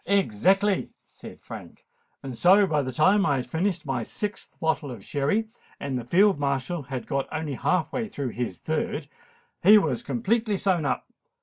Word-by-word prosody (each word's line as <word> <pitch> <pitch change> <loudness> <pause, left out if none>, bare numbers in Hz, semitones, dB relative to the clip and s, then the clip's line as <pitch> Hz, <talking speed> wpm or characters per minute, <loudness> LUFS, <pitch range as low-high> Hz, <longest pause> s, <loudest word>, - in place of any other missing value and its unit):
"Exactly," 195 - +2 0.2
said - - -12
Frank: - - -10 0.4
"and 130 -3 -6
so 190 - +6
by 150 -5 +1
the 130 -1 -3
time 190 +10 +4
I 145 -7 +2
had 125 -2 -2
finished 170 +4 -1
my 135 -3 -1
sixth 210 - -5
bottle 160 -2 0
of 115 -6 -9
Sherry, 150 +11 0 0.3
and 140 -2 -3
the 125 - -2
Field 185 - +3
Marshal 140 +4 -1
had 130 -2 -6 0.3
only 155 -2 -3
got - - -8
half 180 -3 +1
way 230 -3 -1
through 140 -10 -4
his 115 -7 -4
third, - - -2 0.6
he 210 +4 +8
was 210 +2 +1
completely 230 -3 0
sewn 185 -5 +1
up. - - -1
160 Hz, 175 wpm, -26 LUFS, 135-200 Hz, 0.6 s, he